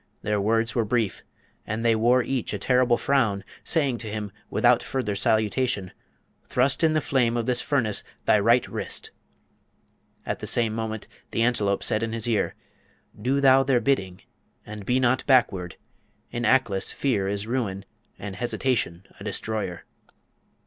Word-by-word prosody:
Their 105 -1 0
words 115 +2 +1
were 115 - +1
brief, 110 -1 -1 0.5
and 110 +2 -3
they 115 -1 +4
wore 120 +3 +3
each 130 -5 -2
a - - -2
terrible 125 +3 +2
frown, 115 -8 +1 0.2
saying 140 -7 0
to 110 - -6
him, 105 -1 -4 0.2
without 120 -1 +3
further 125 -6 -2
salutation, 110 0 0 0.5
'Thrust 130 +5 +1
in 160 -1 +4
the 155 - +2
flame 125 -4 +1
of 115 - -1
this 125 -1 +1
furnace 120 -8 0 0.2
thy 105 - +4
right 115 +4 +3
wrist.' - - -3 1.1
At - - -3
the - - -5
same 115 -2 +3
moment, 110 -1 -4 0.2
the 115 - 0
Antelope 105 -5 +1
said 110 - +1
in 115 0 -2
his 115 0 -3
ear, 115 -3 0 0.7
'Do 130 +5 +1
thou 135 -1 +6
their 135 -2 +2
bidding, 95 -10 -1 0.4
and 105 -2 -9
be 125 +1 +2
not 130 0 +2
backward! 100 -10 +2 0.6
In 120 0 -2
Aklis 110 -6 +2
fear 110 -9 0
is 100 +1 -2
ruin, 110 -5 -2 0.3
and 100 -1 -7
hesitation 120 -6 -1
a - - -9
destroyer.' 105 -3 -3
115 Hz, 155 wpm, -25 LUFS, 105-125 Hz, 1.1 s, thou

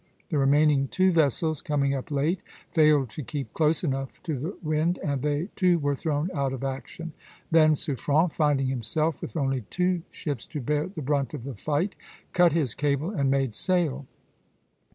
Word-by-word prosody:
The 150 - 0
remaining 140 0 +4
two 185 +6 +3
vessels, 155 -1 +2
coming 140 -2 0
up 135 +3 -4
late, 150 +5 0 0.3
failed 150 -6 +4
to 150 - -6
keep 135 -3 -5
close 160 +1 +2
enough 135 -4 -3
to 160 -4 -2
the 155 +10 -5
wind, 155 +3 +1
and 140 -3 -1
they 150 +6 -1
too 180 -3 +3
were 145 -2 0
thrown 150 +4 -1
out 140 -4 -1
of 135 - -5
action 135 +5 -5
(d, - - -11
e). - - -31 0.3
Then 155 -1 +6
Suffren, 150 +3 +1
finding 145 -4 +2
himself 135 +5 -1
with - - -5
only 135 -3 0
two 180 -1 0
ships 145 -7 -5
to 150 - -5
bear 150 +4 0
the 180 -5 -7
brunt 140 +2 0
of 130 - -7
the 135 +1 -5
fight, 150 - -1 0.4
cut 175 -1 +5
his 150 -8 0
cable 145 +4 0
and 140 -10 0
made 135 -3 +1
sail. 150 - 0
150 Hz, 185 wpm, -26 LUFS, 135-165 Hz, 0.4 s, Then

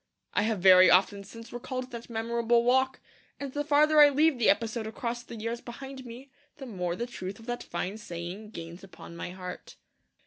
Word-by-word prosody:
I - - +2
have 220 0 0
very 185 0 +8
often 200 +2 +4
since 230 +4 -12
recalled 255 +1 -5
that 235 0 -8
memorable 235 +1 +1
walk; 260 +2 +2 0.4
and 275 -2 -6
the 290 - -1
farther 300 +1 +4
I 295 - +9
leave 295 -1 +3
the 230 - +4
episode 225 -1 +1
across 235 +1 -4
the 235 - -10
years 230 +2 -4
behind 265 +2 -9
me 250 +4 -11 0.3
the 275 - -8
more 180 -7 -3
the 235 - -3
truth 195 -5 -7
of 225 - -14
that 240 0 -4
fine 185 +5 -4
saying 180 +2 -7
gains 170 -2 -9
upon 185 -3 -12
my 170 - -5
heart. 180 0 -8
230 Hz, 195 wpm, -28 LUFS, 195-255 Hz, 0.4 s, I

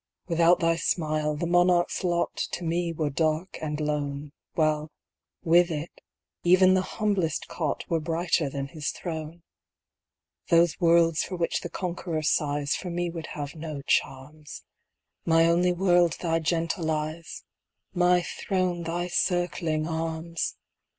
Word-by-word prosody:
Without 170 +1 +4
thy 165 0 +2
smile, 155 -3 0
the 155 - -2
monarch's 175 +1 +2
lot 175 -1 0 0.2
To 180 - -3
me 170 +1 -1
were 155 -3 -2
dark 155 +5 -1
and 150 -1 -3
lone, 145 -1 -2 0.2
While, 155 -1 +1 0.5
with 175 +1 +5
it, 155 0 -4 0.5
even 185 +1 +6
the 185 - +3 0.2
humblest 195 -7 0
cot 155 -4 -3
Were 165 - +1
brighter 165 -1 0
than 140 0 -4
his 155 -2 -4
throne. 160 -1 -6 1.1
Those 170 -2 +4
worlds 165 -1 +4
for 185 - -5
which 170 -1 -1
the 175 - -5
conqueror 170 -3 -3
sighs 145 -1 +1
For 180 - -5
me 175 0 -2
would 165 -2 -6
have 145 -1 -5
no 155 -3 -6
charms; 145 +4 -2 0.6
My 165 0 +4
only 175 +2 +3
world 175 -2 +3
thy 165 -2 0
gentle 165 +1 -1
eyes 155 +1 -4 0.5
My 180 0 +3
throne 185 -2 -2
thy 170 +1 -2
circling 175 -3 0
arms! 165 0 -3
165 Hz, 135 wpm, -26 LUFS, 155-175 Hz, 1.1 s, even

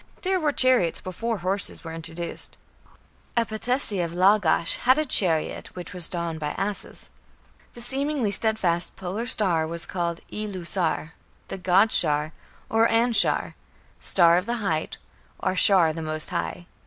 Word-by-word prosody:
There 375 0 0
were 305 -3 0
chariots 255 - +3
before 225 +5 -4
horses 190 +2 0
were 165 -1 -7
introduced. 165 +1 -5 0.8
A 230 - +3
patesi 220 -2 -2
of 170 0 -5
Lagash 185 -3 +3
had 255 +3 +3
a 310 - 0
chariot 175 - +1
which 180 +1 -8
was 180 -3 +3
drawn 170 -2 -4
by 150 -1 -4
asses. 200 +1 -5 0.6
The 240 - -10
seemingly 270 -2 -1
steadfast 190 -5 +1
Polar 195 +6 -5
Star 175 -8 +3
was 170 +1 -2
called 170 -2 -4
"Ilu 205 -4 -6
Sar", 165 -3 -2 0.4
"the - - -6
god 190 +4 +3
Shar", 150 -1 +1 0.3
or 225 +1 +2
Anshar, 230 +1 +4 0.5
"star 170 -2 +4
of 180 +4 -2
the 240 +1 -2
height", 165 -8 -3 0.4
or 185 - -2
"Shar 185 -5 +4
the 165 - -6
most 155 0 -1
high". 175 - -4
185 Hz, 150 wpm, -24 LUFS, 170-225 Hz, 0.8 s, Anshar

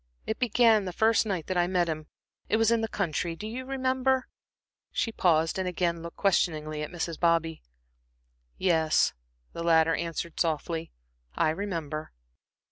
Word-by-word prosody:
It 220 - -3
began 230 -3 +4
the 180 - -4
first 220 +2 +3
night 185 -6 -2
that 185 - -2
I 175 - +3
met 180 -2 +1
him 155 -1 -4 0.4
it - - +3
was 225 0 +3
in 230 -1 +3
the 225 - -1
country, 175 -4 -2
do 210 - -8
you 245 +4 -5
remember?" 260 -1 +1 0.6
She 230 - -1
paused 165 -4 +2
and 185 - -1
again 170 -2 -1
looked 170 0 -9
questioningly 155 -6 +1
at 150 - -4
Mrs. 170 -2 -4
Bobby. 165 -1 +1 1.0
"Yes," 160 - +2 0.4
the - - -5
latter 165 -1 +4
answered 170 0 -4
softly, 165 0 -1 0.4
"I 155 - +2
remember." 160 -4 -4
175 Hz, 155 wpm, -28 LUFS, 160-220 Hz, 1.0 s, began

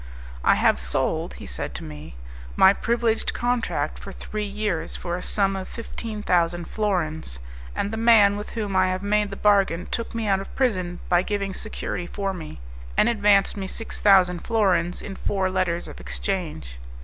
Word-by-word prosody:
"I - - +5
have - - +3
sold," 65 0 -1
he - - -10
said - - -5
to - - -6
me, 75 -3 -9 0.4
"my 190 - +7
privileged 230 0 0
contract 245 -1 -1
for - - -8
three 215 0 -5
years 205 -4 -2
for 175 -1 -3
a 180 - -4
sum 195 -2 +1
of 190 -1 -5
fifteen 225 -2 -6
thousand 175 -2 +1
florins, 160 - -1 0.4
and 200 - -1
the - - -2
man 220 -3 +6
with 205 0 -6
whom 205 -3 -2
I 185 0 +4
have 185 +1 -2
made 210 0 +2
the 200 - -6
bargain 195 -4 +3
took 230 0 -3
me 225 -1 -1
out 195 -2 +2
of 195 - -9
prison 185 -9 0
by 175 0 +4
giving 200 0 -2
security 185 -4 -4
for 195 0 -3
me, 160 - -8 0.4
and 225 - +5
advanced 205 -3 +3
me 195 -2 -4
six 225 +4 -6
thousand 185 -3 +5
florins 180 -5 +1
in 195 - -6
four 190 -1 -1
letters 180 -2 0
of 65 - -10
exchange." - - -4
195 Hz, 180 wpm, -24 LUFS, 175-210 Hz, 0.4 s, my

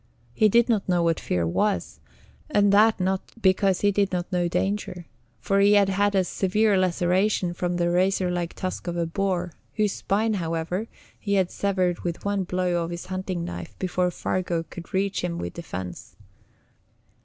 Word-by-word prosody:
He 215 - +4
did 235 +3 +4
not 215 -6 0
know 175 -1 +3
what 165 -1 +1
fear 90 -2 -1
was, 205 - -1 0.5
and 205 -7 +3
that 215 +1 +5
not 190 +1 0 0.2
because 190 -2 +3
he 205 - +4
did 200 0 +1
not 180 0 -3
know 175 -1 +1
danger; 185 -1 -2 0.3
for 195 0 +1
he 200 +1 +5
had 200 -1 +5
had 200 +1 +1
a 190 - +4
severe 200 +4 +1
laceration 185 +1 +1
from 175 0 -2
the 175 0 +1
razor 185 0 +2
like 175 -1 -3
tusk 185 0 -4
of 175 0 -2
a 170 - +1
boar 180 0 -1 0.2
whose 210 -2 +1
spine, 215 +3 0
however, 170 +3 -2 0.3
he 200 -2 -1
had 190 -2 +2
severed 185 -3 0
with 170 +1 -5
one 200 -2 0
blow 180 -1 0
of 165 - -4
his 170 0 -6
hunting 185 -2 -3
knife 175 - -7
before 180 -1 0
Fargu 175 -1 -2
could 175 - -9
reach 195 0 0
him 170 -1 -2
with - - -5
defense. 95 - -7
185 Hz, 175 wpm, -25 LUFS, 175-200 Hz, 0.5 s, that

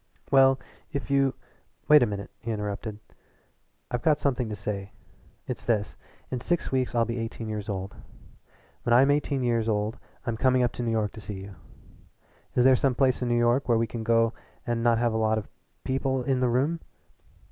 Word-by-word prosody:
"Well, 135 -1 +6 0.3
if 140 -2 -4
you 135 -1 +3 0.3
" - - -41
"Wait 150 -1 +8
a 120 - +4
minute," 100 -1 -5
he 115 - -7
interrupted. 105 0 -3 0.9
"I've 120 - -1
got 155 -2 +3
something 125 -4 0
to 105 - -3
say. 100 -1 -5 0.5
It's 125 -3 -5
this: 105 -3 0 0.4
in 130 - -1
six 175 +7 -1
weeks 130 -2 0
I'll 115 -1 +3
be 115 +1 -3
eighteen 115 0 -5
years 105 -1 -4
old. 95 0 -4 0.9
When 120 - +3
I'm 135 +3 +6
eighteen 145 -2 0
years 115 -2 +1
old 105 +1 -1 0.3
I'm 115 -2 -2
coming 130 +1 +3
up 120 - +1
to 120 - -6
New 120 - -1
York 110 -2 0
to 110 - -10
see 100 +1 -6
you. 100 +1 -9 1.0
Is 125 - +4
there 130 0 +7
some 130 0 +1
place 130 -2 +2
in 125 - 0
New 120 - +2
York 120 +3 +2
where 115 - +5
we 115 - +2
can 115 0 -6
go 115 0 +3 0.3
and 120 -1 -1
not 115 -1 +3
have 120 -1 +1
a - - 0
lot 110 0 +2
of 110 - -4 0.4
people 130 0 0
in 130 0 +1
the 125 -1 +2
room?" 140 +8 +1
120 Hz, 200 wpm, -27 LUFS, 110-130 Hz, 1.0 s, Wait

